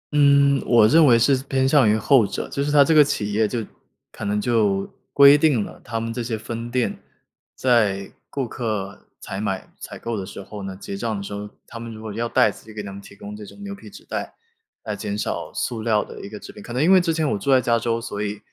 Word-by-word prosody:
嗯， 140 Hz, -1 st, +5 dB
我 115 Hz, -3 st, +6 dB
认 155 Hz, +4 st, +6 dB
为 120 Hz, -3 st, +6 dB
是 135 Hz, +4 st, +4 dB
偏 130 Hz, -1 st, +2 dB
向 135 Hz, -6 st, +5 dB
于 110 Hz, -, +3 dB
后 110 Hz, +1 st, +4 dB
者， -, -, -4 dB
就 140 Hz, -, -2 dB
是 145 Hz, -, -1 dB
它 145 Hz, -1 st, +7 dB
这 160 Hz, -, +2 dB
个 150 Hz, -1 st, +8 dB
企 105 Hz, -7 st, -2 dB
业 110 Hz, +1 st, +2 dB
就 115 Hz, -1 st, -3 dB, 0.5 s
可 -, -, -9 dB
能 105 Hz, +1 st, 0 dB
就 105 Hz, -4 st, +1 dB, 0.2 s
规 140 Hz, 0 st, +8 dB
定 145 Hz, -7 st, +3 dB
了 -, -, -12 dB
他 115 Hz, -, -3 dB
们 115 Hz, 0 st, -4 dB
这 120 Hz, -, -3 dB
些 115 Hz, -1 st, -3 dB
分 115 Hz, +2 st, -6 dB
店 125 Hz, 0 st, -1 dB, 0.6 s
在 105 Hz, -6 st, +1 dB, 0.2 s
顾 135 Hz, -3 st, -3 dB
客 105 Hz, -5 st, -4 dB
采 95 Hz, -, -6 dB
买、 95 Hz, -3 st, -4 dB
采 -, -, -8 dB
购 115 Hz, -1 st, -4 dB
的 100 Hz, -, -3 dB
时 95 Hz, -, -9 dB
候 105 Hz, +2 st, -9 dB
呢， 95 Hz, -1 st, -6 dB
结 100 Hz, -, -7 dB
账 110 Hz, 0 st, -2 dB
的 100 Hz, -, -5 dB
时 100 Hz, -, -7 dB
候， 105 Hz, 0 st, -6 dB, 0.2 s
他 115 Hz, -, -9 dB
们 115 Hz, 0 st, -7 dB
如 110 Hz, 0 st, -10 dB
果 110 Hz, -2 st, -6 dB
要 115 Hz, +2 st, -2 dB
袋 105 Hz, -, +4 dB
子 -, -, -15 dB
就 110 Hz, -, -12 dB
给 105 Hz, -, -5 dB
他 100 Hz, -, -7 dB
们 100 Hz, +1 st, -9 dB
提 100 Hz, -, -14 dB
供 100 Hz, +1 st, -9 dB
这 105 Hz, -, -9 dB
种 200 Hz, -, -12 dB
牛 200 Hz, 0 st, -6 dB
皮 200 Hz, -, -12 dB
纸 -, -, -14 dB
袋， -, -, -5 dB, 0.5 s
来 105 Hz, -1 st, -4 dB
减 100 Hz, 0 st, -4 dB
少 -, -, -3 dB
塑 115 Hz, -2 st, -3 dB
料 110 Hz, -2 st, +2 dB
的 -, -, -10 dB
一 -, -, -8 dB
个 105 Hz, 0 st, -8 dB
制 -, -, -11 dB
品。 -, -, -12 dB
可 120 Hz, -, -8 dB
能 130 Hz, +5 st, +1 dB
因 180 Hz, -, +4 dB
为 190 Hz, -1 st, +7 dB
之 170 Hz, -1 st, 0 dB
前 160 Hz, -2 st, 0 dB
我 -, -, +1 dB
住 140 Hz, -, -4 dB
在 130 Hz, -1 st, +6 dB
加 120 Hz, -1 st, +1 dB
州， 115 Hz, 0 st, -1 dB
所 105 Hz, -4 st, -5 dB
以， 105 Hz, 0 st, -3 dB
115 Hz, 285 characters per minute, -22 LUFS, 105-130 Hz, 0.6 s, 个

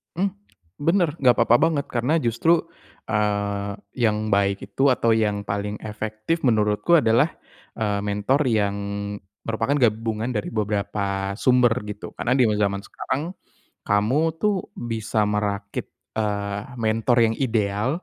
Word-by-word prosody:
Mmm, 190 Hz, +3 st, 0 dB, 0.5 s
bener 165 Hz, +2 st, +2 dB
enggak 125 Hz, -3 st, +5 dB
apa-apa 115 Hz, +1 st, +5 dB
banget 150 Hz, -4 st, -1 dB
karena 120 Hz, +5 st, 0 dB
justru, 145 Hz, +8 st, +2 dB, 0.5 s
eee, 100 Hz, -1 st, 0 dB, 0.2 s
yang 110 Hz, -2 st, +1 dB
baik 100 Hz, 0 st, +2 dB
itu 135 Hz, +1 st, +2 dB
atau 115 Hz, -2 st, +1 dB
yang 105 Hz, -2 st, +1 dB
paling 100 Hz, +1 st, -3 dB
efektif 110 Hz, +8 st, -3 dB
menurutku 105 Hz, +8 st, +3 dB
adalah, 115 Hz, +5 st, +4 dB, 0.5 s
eee, 105 Hz, -2 st, -1 dB
mentor 105 Hz, +8 st, +1 dB
yang 105 Hz, -3 st, +1 dB, 0.7 s
merupakan 115 Hz, +5 st, 0 dB
gabungan 110 Hz, -1 st, +1 dB
dari 105 Hz, -3 st, -3 dB
beberapa 100 Hz, -2 st, -1 dB
sumber 125 Hz, -2 st, +4 dB, 0.2 s
gitu. 105 Hz, 0 st, -7 dB
Karena 125 Hz, +2 st, 0 dB
di 130 Hz, -, +4 dB
we 105 Hz, -, +1 dB
zaman 100 Hz, 0 st, 0 dB
sekarang, 145 Hz, -, -4 dB, 0.6 s
kamu 105 Hz, +8 st, +2 dB, 0.2 s
tuh 210 Hz, +4 st, +1 dB, 0.2 s
bisa 110 Hz, -2 st, -1 dB
merakit, 100 Hz, -1 st, -2 dB, 0.3 s
eee, 100 Hz, -2 st, -1 dB
mentor 115 Hz, +1 st, +1 dB
yang 115 Hz, 0 st, +2 dB
ideal 110 Hz, -3 st, 0 dB
110 Hz, 130 wpm, -23 LUFS, 105-125 Hz, 0.7 s, enggak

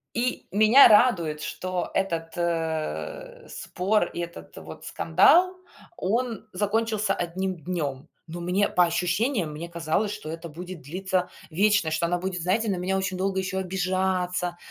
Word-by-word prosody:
И 245 Hz, +2 st, -1 dB
меня 215 Hz, +6 st, +8 dB
радует, 175 Hz, -9 st, +4 dB
что 180 Hz, +4 st, -4 dB
этот, 165 Hz, -4 st, -2 dB
э, 170 Hz, -, -3 dB
спор, 195 Hz, +1 st, 0 dB
и 175 Hz, -, -6 dB
этот 170 Hz, -, -8 dB
вот 80 Hz, 0 st, -10 dB
скандал, 345 Hz, -, +4 dB, 0.4 s
он 225 Hz, +1 st, -2 dB
закончился 210 Hz, +1 st, 0 dB
одним 185 Hz, +1 st, -3 dB
днём. 150 Hz, -4 st, -3 dB, 0.2 s
Но 165 Hz, +2 st, -7 dB
мне 180 Hz, +4 st, +1 dB
по 180 Hz, -, +4 dB
ощущениям, 180 Hz, -, 0 dB
мне 155 Hz, +3 st, -6 dB
казалось, 170 Hz, +5 st, -1 dB
что 210 Hz, -7 st, -8 dB
это 165 Hz, +1 st, -6 dB
будет 175 Hz, +2 st, -9 dB
длиться 185 Hz, +5 st, -2 dB, 0.2 s
вечно, 195 Hz, -1 st, +2 dB
что 160 Hz, +2 st, 0 dB
она 175 Hz, +1 st, 0 dB
будет, 180 Hz, 0 st, -3 dB
знаете, 205 Hz, +5 st, +1 dB
на 185 Hz, -, -1 dB
меня 185 Hz, +2 st, -1 dB
очень 185 Hz, -1 st, -2 dB
долго 190 Hz, +1 st, 0 dB
ещё 190 Hz, 0 st, -2 dB
обижаться, 185 Hz, -1 st, -1 dB
185 Hz, 145 wpm, -26 LUFS, 170-205 Hz, 0.4 s, меня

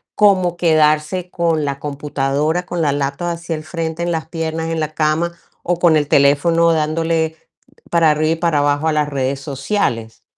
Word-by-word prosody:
como 185 Hz, -4 st, +3 dB
quedarse 155 Hz, +2 st, +2 dB
con 165 Hz, -3 st, 0 dB
la 140 Hz, 0 st, -3 dB
computadora, 145 Hz, +3 st, -1 dB
con 175 Hz, -2 st, -3 dB
la 145 Hz, -3 st, +2 dB
laptop 140 Hz, +4 st, -2 dB
así 170 Hz, 0 st, -6 dB
al 155 Hz, 0 st, -5 dB
frente, 165 Hz, 0 st, -4 dB
en 175 Hz, -, -1 dB
las 160 Hz, -1 st, -3 dB
piernas, 160 Hz, -1 st, -3 dB
en 165 Hz, -1 st, -2 dB
la 155 Hz, 0 st, -3 dB
cama 160 Hz, +2 st, 0 dB, 0.3 s
o 175 Hz, 0 st, -1 dB
con 165 Hz, -3 st, +4 dB
el 145 Hz, -1 st, 0 dB
teléfono 165 Hz, +4 st, +4 dB
dándole 160 Hz, +1 st, 0 dB, 0.6 s
para 165 Hz, -2 st, +4 dB
arriba 155 Hz, +1 st, +1 dB
y -, -, -2 dB
para 165 Hz, -3 st, +1 dB
abajo 145 Hz, +2 st, +1 dB
a 155 Hz, -, +2 dB
las 150 Hz, -1 st, 0 dB
redes 135 Hz, -1 st, -2 dB
sociales. 135 Hz, -, -2 dB
160 Hz, 180 wpm, -18 LUFS, 145-170 Hz, 0.6 s, con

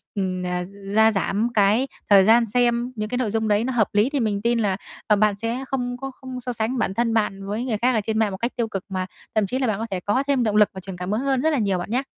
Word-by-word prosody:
ừm, 185 Hz, -2 st, -2 dB
ờ, 180 Hz, 0 st, -2 dB, 0.3 s
gia 220 Hz, 0 st, +6 dB
giảm 205 Hz, +3 st, 0 dB
cái 215 Hz, +6 st, +3 dB, 0.2 s
thời 195 Hz, -2 st, +7 dB
gian 230 Hz, +3 st, +5 dB
xem 240 Hz, +2 st, +1 dB
những 215 Hz, 0 st, -3 dB
cái 250 Hz, -, -2 dB
nội 225 Hz, -5 st, -1 dB
dung 220 Hz, -1 st, 0 dB
đấy 210 Hz, +1 st, +2 dB
nó 260 Hz, +1 st, -2 dB
hợp 220 Hz, -4 st, +2 dB
lý 210 Hz, +6 st, +3 dB
thì 285 Hz, -, -1 dB
mình 210 Hz, -4 st, 0 dB
tin 235 Hz, +1 st, +1 dB
là, 195 Hz, -3 st, +1 dB, 0.3 s
ờ, 210 Hz, -, +5 dB
bạn 210 Hz, 0 st, +2 dB
sẽ 235 Hz, +3 st, -2 dB
không 245 Hz, -2 st, -2 dB
có 270 Hz, +1 st, -6 dB
không 255 Hz, -1 st, -7 dB
so 245 Hz, 0 st, -4 dB
sánh 230 Hz, +3 st, -2 dB
bản 190 Hz, -, 0 dB
thân 230 Hz, +1 st, 0 dB
bạn 195 Hz, -3 st, -1 dB
với 215 Hz, +5 st, -3 dB
người 225 Hz, -5 st, -1 dB
khác 250 Hz, +3 st, +2 dB
ở 220 Hz, -, +1 dB
trên 220 Hz, 0 st, -1 dB
mạng 215 Hz, -3 st, +2 dB
một 190 Hz, -, -5 dB
cách 235 Hz, +4 st, -3 dB
tiêu 235 Hz, -2 st, -1 dB
cực 195 Hz, -3 st, -5 dB
mà 185 Hz, -1 st, -2 dB, 0.3 s
thậm 215 Hz, -2 st, +2 dB
chí 255 Hz, +6 st, -2 dB
là 260 Hz, -, +1 dB
bạn 215 Hz, -1 st, -1 dB
có 225 Hz, -, -2 dB
thể 185 Hz, -, -1 dB
có 205 Hz, +9 st, 0 dB
thêm 270 Hz, -4 st, +2 dB
động 210 Hz, -2 st, 0 dB
lực 210 Hz, -1 st, +5 dB
và 190 Hz, -, -7 dB
truyền 190 Hz, -1 st, -8 dB
cảm 180 Hz, +2 st, -4 dB
hứng 220 Hz, +4 st, 0 dB
hơn 270 Hz, -2 st, +1 dB
rất 315 Hz, -, +2 dB
là 300 Hz, -, +1 dB
nhiều 200 Hz, -5 st, +1 dB
bạn 175 Hz, -, -5 dB
nhá. 255 Hz, +3 st, +1 dB
220 Hz, 305 wpm, -23 LUFS, 200-245 Hz, 0.3 s, thời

